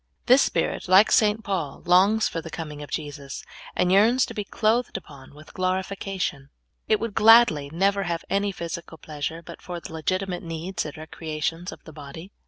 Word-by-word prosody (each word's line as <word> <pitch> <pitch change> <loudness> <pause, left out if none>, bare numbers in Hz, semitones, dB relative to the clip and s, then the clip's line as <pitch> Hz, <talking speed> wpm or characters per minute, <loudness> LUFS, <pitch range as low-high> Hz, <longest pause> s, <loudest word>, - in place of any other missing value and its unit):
This 260 +2 +6
spirit, - - -1
like 190 +4 +6
St. 215 0 +3
Paul, 185 -10 -3
longs 195 +5 +4
for 165 - -4
the 165 - -9
coming 150 -2 -7
of 145 - -8
Jesus, 145 -2 -6 0.3
and 180 - +2
j 190 - +6
earns 235 +5 +4
to - - -9
be 210 - -3
clothed 225 +4 0
upon 140 -1 -13
with 155 +1 -15
glorification. 185 -5 -2 0.4
It 215 - +3
w^ould 230 -2 -4
gladly 215 -11 +6
never 195 +4 +1
have 170 -1 -3
any 200 +1 0
physical 170 -2 -7
pleasure 155 +2 -5
but - - -11
for 175 -1 -6
the 160 - -10
legitimate 185 +3 -2
needs 170 +2 -4
and 150 - -7
recreations 160 +2 -4
of - - -12
the 160 - -12
body. 155 +5 -10
175 Hz, 185 wpm, -25 LUFS, 155-200 Hz, 0.4 s, This